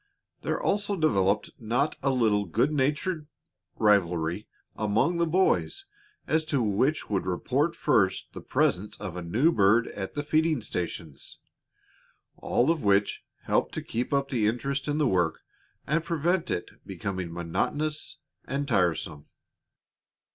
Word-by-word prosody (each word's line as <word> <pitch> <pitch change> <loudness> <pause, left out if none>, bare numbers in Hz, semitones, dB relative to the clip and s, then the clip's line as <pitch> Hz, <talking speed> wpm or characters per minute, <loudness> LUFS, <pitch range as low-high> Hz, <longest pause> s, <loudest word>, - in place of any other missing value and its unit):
There - - -1
also 205 0 0
developed 105 - +1
not 120 +7 0
a 135 - +1
little 110 -6 +2
good 115 - +1
natured 150 +3 0 0.5
rivalry 90 -3 +2 0.3
among 110 - +1
the 170 0 +2
boys 190 - +1 0.4
as 160 +1 +1
to 145 -6 0
which 115 +9 +1
would 100 -3 0
first - - -1 0.5
report 100 -10 +2
the - - -7
presence 105 +4 0
of 95 -4 -6
a 90 - -4
new 115 - +2
bird 110 -2 +3
at 95 -2 -6
the 145 - -2
feeding 155 -3 +1
stations; 85 -6 -5 1.0
all 130 +7 +2
of 165 -3 -2
which 100 0 +2 0.2
helped - - 0
to - - -3
keep 120 +2 -3
up 140 -1 +1
the 115 -5 +2
interest 135 +5 -1
in 145 0 0
the 150 -3 +2
work 90 -7 +1 0.4
and 155 +3 +1
prevent 170 +2 0
it 85 - -3
becoming 95 -3 -4
monotonous 145 - -2 0.3
and 140 +1 -2
tiresome. 85 - 0
120 Hz, 140 wpm, -27 LUFS, 95-155 Hz, 1.0 s, bird